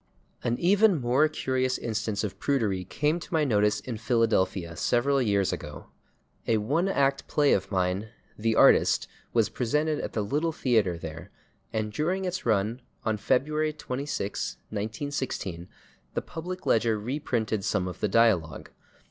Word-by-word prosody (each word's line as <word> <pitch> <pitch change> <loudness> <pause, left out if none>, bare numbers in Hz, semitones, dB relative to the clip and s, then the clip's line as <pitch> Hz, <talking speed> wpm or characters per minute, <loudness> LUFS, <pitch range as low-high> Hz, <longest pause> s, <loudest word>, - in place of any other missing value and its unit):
An 120 0 0
even 195 0 +4
more 130 +5 +3
curious 130 -4 -1
instance 110 -2 -2
of 105 - -4
prudery 110 -10 0
came 150 - 0
to - - -11
my 160 -2 +2
notice 105 -6 +2
in 120 -4 -5
Philadelphia 110 -7 +1
several 135 +7 +2
years 100 -5 +1
ago. 75 -1 -8 0.6
A 115 - +3
one 145 - +1
act 140 -6 +1
play 145 -1 +3
of 95 - 0
mine, 95 +2 -1 0.3
"The 110 +1 0
Artist," - - +5 0.2
was 115 -3 +2
presented 150 +5 0
at - - -5
the 110 - 0
Little 150 +10 0
Theatre 110 - +1
there, 80 +3 -8 0.4
and 110 -2 -2
during 180 - -1
its 180 -7 -3
run, 110 +3 +1 0.2
on 110 -1 +1
February 150 +7 +1
26, 135 -7 -3 0.2
1916, 110 - -4 0.5
the - - 0
/Public 180 +3 -6
Ledger/ 115 -1 +2
reprinted 115 -4 -2
some 95 -3 0
of 90 - -7
the - - +1
dialogue. 95 -9 +2
115 Hz, 150 wpm, -27 LUFS, 105-145 Hz, 0.6 s, Artist